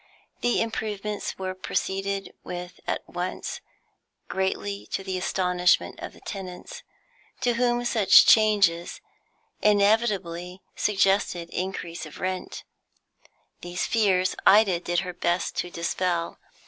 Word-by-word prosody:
The 245 - +1
improvements 210 -2 -4
were 185 -1 -3
proceeded 195 +1 -3
with 180 0 -7
at - - -2
once, - - -4 0.7
greatly 195 +1 -2
to 195 - -3
the 190 -1 -3
astonishment 180 -1 +1
of - - -7
the - - -17
tenants, 195 - -7 0.6
to 245 -2 +2
whom 240 0 +1
such 220 -5 +6
changes 200 -6 +4 0.6
inevitably 200 -4 +1
suggested 195 -4 +1
increase 175 -3 -4
of 155 - -12
rent. 185 0 -4 1.0
These 175 +1 -3
fears 190 -5 +2
Ida 200 -4 +5
did 175 0 0
her 180 -1 -5
best 175 0 -1
to 175 - -1
dispel. 170 0 -2
190 Hz, 110 wpm, -26 LUFS, 180-210 Hz, 1.0 s, such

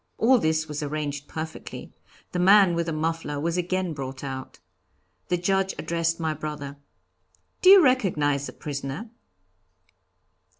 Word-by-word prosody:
All 250 +2 +4
this 160 -3 0
was 150 0 -5
arranged 145 -1 -4
perfectly. 160 0 -7 0.4
The 180 - -2
man 195 0 +6
with 170 0 -1
the - - -1
muffler 155 -2 -2
was 165 +3 -1
again 180 -1 -1
brought 135 -2 -6
out. 130 -1 -6 0.7
The 180 - +1
Judge 190 +2 0
addressed 165 0 -1
my 160 -1 -1
brother. 145 -2 -6 0.8
'Do 370 - +6
you 390 -2 +9
recognize 155 - +2
the - - -9
prisoner?' 145 - -6
160 Hz, 135 wpm, -25 LUFS, 145-180 Hz, 0.8 s, you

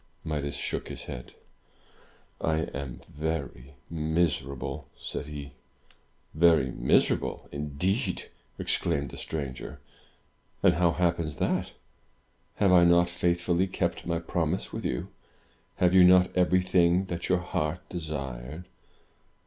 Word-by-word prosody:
Midas 70 -2 -2
shook - - -3
his - - -7
head. 60 - -8 1.1
"I 80 0 +2
am 65 -2 -6
very 75 -4 -4
miserable," 80 -4 -1
said - - -5
he. 70 -2 -7 0.8
"Very 80 -4 +4
miserable, - - +1
indeed!" 75 +6 -1 0.3
exclaimed 70 -6 0
the - - -9
stranger. 70 -5 -5 0.8
"And 90 - +6
how 85 -1 +3
happens 85 -3 0
that? - - -1 0.8
Have 100 -2 +3
I 90 -1 +7
not 85 0 +5
faithfully 85 +1 +1
kept 90 - -2
my 85 -1 +1
promise 85 +1 -2
with - - -4
you? 60 - -2 0.7
Have 90 0 +3
you 95 -1 +8
not 90 0 +6
everything 90 0 +3
that 85 -2 -4
your 90 - +4
heart 90 -1 -3
desired?" 75 -2 -5
85 Hz, 115 wpm, -28 LUFS, 70-90 Hz, 1.1 s, you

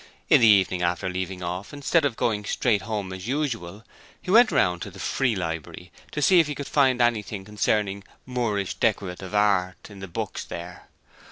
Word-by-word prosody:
In - - +6
the 115 - +7
evening 95 -3 +4
after 90 +1 -1
leaving 90 0 -4
off, 90 +3 -5
instead 145 +2 +1
of 130 -5 0
going 105 -3 0
straight 105 0 +1
home 105 -3 -4
as 95 +2 -7
usual 115 - -3 0.3
he 180 - -5
went 230 +3 +6
round 90 -1 +2
to - - -5
the 100 - -14
Free 125 +3 0
Library 85 0 -5 0.2
to 150 - -2
see 180 +5 +6
if 160 - +3
he 145 - -4
could 145 - -5
find 130 -4 +3
anything 110 -4 0
concerning 105 -1 -1 0.2
Moorish 115 -6 -2
decorative 95 0 -2
work 100 -3 +2
in - - -12
any 100 - -11
of - - -12
the 95 - -6
books 85 - -5
there. 85 +1 -9
105 Hz, 195 wpm, -25 LUFS, 95-125 Hz, 0.3 s, the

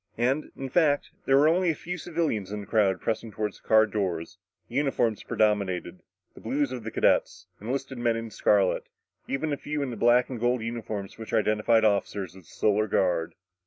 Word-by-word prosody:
And, 130 +6 0
in 135 - -4
fact, 145 0 +2
there 135 - +4
were 145 +2 +5
only 175 +2 +3
a 160 - +1
few 180 +4 -5
civilians 155 - -2
in 105 0 -4
the - - -9
crowd 100 -5 +2
pressing 110 0 -3
toward 105 -1 -3
the - - -17
car 110 0 +4
doors. 95 -5 -3 0.3
Uniforms 120 -4 0
predominated 100 -4 0 0.3
the - - -14
blue 135 +6 0
of 130 -4 -4
the 115 - -4
cadets, - - +1 0.2
enlisted 135 +3 -4
men 120 -1 +1
in 115 -1 -5
scarlet, 100 -3 +2 0.4
even 145 +2 -1
a - - -2
few 150 0 -3
in 130 - -3
the - - -5
black 120 +2 +4
and 125 -3 -6
gold 120 0 +1
uniforms 110 -4 -5
which 110 - -8
identified 110 +1 +3
the - - +6
officers 100 -2 -2
of 95 - -12
the - - -20
Solar 105 0 +1
Guard. 90 -4 0
115 Hz, 200 wpm, -27 LUFS, 105-135 Hz, 0.4 s, the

